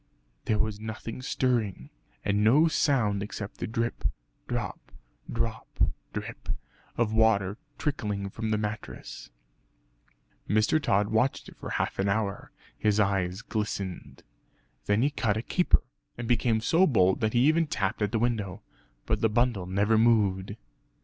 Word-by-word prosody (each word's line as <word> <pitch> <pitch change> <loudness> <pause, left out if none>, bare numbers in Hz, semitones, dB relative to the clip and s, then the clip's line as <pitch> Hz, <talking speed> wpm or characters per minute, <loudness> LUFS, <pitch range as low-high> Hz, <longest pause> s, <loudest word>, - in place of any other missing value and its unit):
There 110 - +2
was 105 -1 -1
nothing 110 +2 -6
stirring, 120 -6 -1 0.3
and 100 +1 +2
no 140 +10 +6
sound 120 -11 +2
except 105 0 -6
the - - -2
drip, 115 +1 -2 0.4
drop, - - -4 0.4
drop 115 -1 -3 0.3
drip - - -6 0.5
of 115 -2 +1
water 110 -2 +3 0.2
trickling 105 -9 -2
from 110 +1 -3
the 110 - +2
mattress. 105 0 -6 1.2
Mr. 110 +10 +3
Tod 100 -5 +2
watched 110 +5 +1
it - - -15
for - - -7
half - - -2
an 100 +1 +2
hour; 100 -1 -1 0.2
his 105 0 +1
eyes 95 -1 +1
glistened. 100 -4 -4 0.6
Then 105 +3 +3
he 145 - +2
cut 110 -7 0
a 110 - -3
caper, 180 +7 +2 0.3
and 120 -1 -4
became 115 -1 +2
so 170 +10 +4
bold 95 -8 +3
that 110 -1 +1
he 120 - +3
even 160 +1 +3
tapped 100 -5 -1
at 105 -1 +1
the 115 - +1
window; 110 -4 -1 0.4
but 110 -1 0
the 110 - +4
bundle 115 -4 +1
never 105 +4 +2
moved. 105 -4 +3
110 Hz, 145 wpm, -28 LUFS, 100-115 Hz, 1.2 s, no